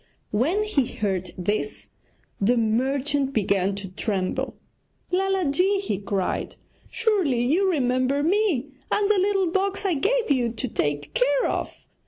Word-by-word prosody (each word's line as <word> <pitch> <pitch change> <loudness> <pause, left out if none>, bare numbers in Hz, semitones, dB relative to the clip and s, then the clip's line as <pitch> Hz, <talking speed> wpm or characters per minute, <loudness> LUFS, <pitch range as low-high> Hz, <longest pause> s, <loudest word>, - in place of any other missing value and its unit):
When 315 - +1
he 295 - +1
heard 190 -4 -2
this 205 - -2 0.5
the 235 +5 +3
merchant 270 +5 +1
began 195 -3 +1
to 200 -1 -6
tremble. 185 0 -2 0.6
'Lala 380 -4 +1
ji!' 375 +7 +2
he 385 - -2
cried, 195 -2 -2 0.3
'surely 395 - +1
you 365 +9 +3
remember 260 -2 +1
me 335 - +1 0.2
and 415 0 +2
the 410 - +3
little 385 -2 +2
box 390 +2 0
I 380 - +2
gave 460 - +1
you 245 -4 +1
to 255 - -3
take 145 -8 -2
care 280 +3 +2
of? - - -3
275 Hz, 140 wpm, -24 LUFS, -, 0.6 s, the